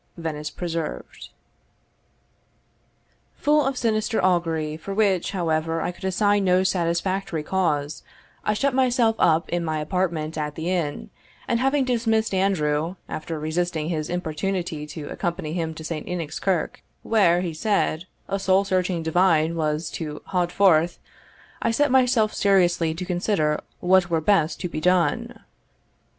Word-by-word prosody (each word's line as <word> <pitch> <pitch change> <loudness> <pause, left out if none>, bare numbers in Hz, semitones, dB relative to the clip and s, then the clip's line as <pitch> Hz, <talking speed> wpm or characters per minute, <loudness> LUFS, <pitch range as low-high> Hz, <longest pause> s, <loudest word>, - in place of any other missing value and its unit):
Venice 155 -2 -4
Preserved. 165 -2 -5 2.1
Full 300 0 +3
of 270 -1 -1
sinister 220 -1 0
augury, 165 -4 +1
for 195 +5 -6
which, 195 -4 +2
however, 165 -3 -1
I 175 - -1
could 180 - -10
assign 205 +2 +2
no 185 0 +3
satisfactory 175 -1 -1
cause, 150 -5 -1 0.4
I 210 - +1
shut 275 +4 +1
myself 245 -3 +3
up 165 +1 +3
in 175 0 -1
my 155 -1 -1
apartment 160 -2 -2
at 150 -1 -3
the 165 +3 -2
inn, 160 -6 -2 0.4
and 235 - +1
having 270 +1 +2
dismissed 225 -3 +1
Andrew, 170 -4 +1
after 160 0 -5
resisting 160 0 -2
his 155 -3 -2
importunity 175 -2 -3
to 150 -1 -7
accompany 170 -3 -3
him 165 -2 -2
to 160 - -8
St. 160 -1 -5
Enoch's 165 -4 -4
Kirk,* 185 -5 -1 0.2
where, 180 -6 +3
he 175 -3 -3
said, 175 -2 0 0.2
"a 195 - -2
soul 190 +1 +3
searching 185 -3 0
divine 165 -1 +2
was 155 0 -1
to 150 -2 -6
haud 180 -2 -1
forth," 175 -4 +3 0.6
I - - +1
set 285 +4 +2
myself 250 -4 +3
seriously 175 -5 +2
to 180 +2 -5
consider 175 -4 0 0.2
what 185 0 +4
were 165 -1 +2
best 160 -1 +2
to 180 - -1
be 155 -2 -5
done. 175 -3 +1
175 Hz, 145 wpm, -24 LUFS, 160-195 Hz, 2.1 s, what